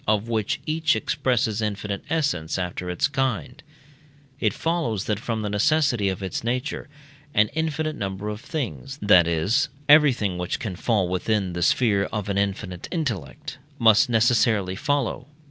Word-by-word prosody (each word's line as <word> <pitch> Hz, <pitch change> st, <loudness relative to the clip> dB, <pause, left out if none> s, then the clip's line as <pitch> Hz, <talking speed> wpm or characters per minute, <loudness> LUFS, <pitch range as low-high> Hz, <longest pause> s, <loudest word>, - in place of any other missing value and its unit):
of 105 Hz, +1 st, +1 dB
which 110 Hz, -3 st, -1 dB
each 155 Hz, -2 st, +1 dB
expresses 120 Hz, -3 st, 0 dB
infinite 105 Hz, -1 st, -3 dB
essence 140 Hz, -, -1 dB
after 90 Hz, 0 st, -4 dB
its 90 Hz, +10 st, +1 dB
kind, 130 Hz, -1 st, -2 dB, 0.8 s
it 110 Hz, -5 st, +2 dB
follows 125 Hz, -, -1 dB
that 105 Hz, -1 st, -1 dB
from 110 Hz, -1 st, -3 dB
the 105 Hz, -, -2 dB
necessity 120 Hz, -1 st, +2 dB
of 95 Hz, +1 st, -4 dB
its 95 Hz, -, -3 dB
nature 125 Hz, +4 st, -3 dB, 0.5 s
an 105 Hz, 0 st, +4 dB
infinite 155 Hz, -1 st, -2 dB
number 100 Hz, -2 st, -4 dB
of 105 Hz, +1 st, -5 dB
things 120 Hz, -, -5 dB
(that 85 Hz, -2 st, +5 dB
is, 85 Hz, -, +1 dB, 0.2 s
everything 130 Hz, -, +4 dB
which 90 Hz, +6 st, -2 dB
can 110 Hz, -8 st, -5 dB
fall 100 Hz, 0 st, +1 dB
within 95 Hz, +1 st, -1 dB
the 90 Hz, -, -4 dB
sphere 100 Hz, 0 st, +3 dB
of 105 Hz, -2 st, -4 dB
an 100 Hz, -, -1 dB
infinite 95 Hz, -3 st, -3 dB
intellect) 115 Hz, -, -4 dB, 0.2 s
must 115 Hz, +3 st, +5 dB
necessarily 115 Hz, -5 st, +2 dB
follow. 140 Hz, 0 st, -1 dB
110 Hz, 150 wpm, -24 LUFS, 95-130 Hz, 0.8 s, that